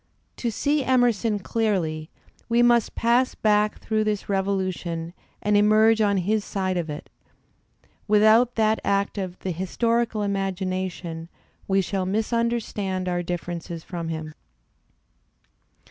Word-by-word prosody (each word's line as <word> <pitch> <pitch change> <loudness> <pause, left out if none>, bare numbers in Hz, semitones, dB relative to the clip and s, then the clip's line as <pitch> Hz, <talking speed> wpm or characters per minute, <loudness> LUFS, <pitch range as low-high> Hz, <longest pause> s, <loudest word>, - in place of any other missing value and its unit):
To 240 - -1
see 285 +6 0
Emerson 240 -4 +2
clearly 180 -8 -1 0.4
we 235 +1 +4
must 240 -2 +3
pass 240 +2 +2
back 210 0 +2
through 215 -1 0
this 210 -2 -2
revolution 185 -4 -2 0.3
and 210 0 +2
emerge 215 +2 +5
on 200 -2 +3
his 205 +3 0
side 190 -2 -2
of 170 -3 -2
it; 150 +3 -6 1.0
without 220 +3 +5
that 220 -1 +2
act 200 +1 0
of 185 -2 -4
the 185 - -2
historical 225 +5 0
imagination 185 -4 -3 0.4
we 195 0 +3
shall 190 0 -2
mis 215 +4 -1
understand 215 -5 -1
our 175 -1 0
differences 170 -1 -5
from 170 -3 -5
him. 160 -1 -5
200 Hz, 125 wpm, -24 LUFS, 180-220 Hz, 1.0 s, emerge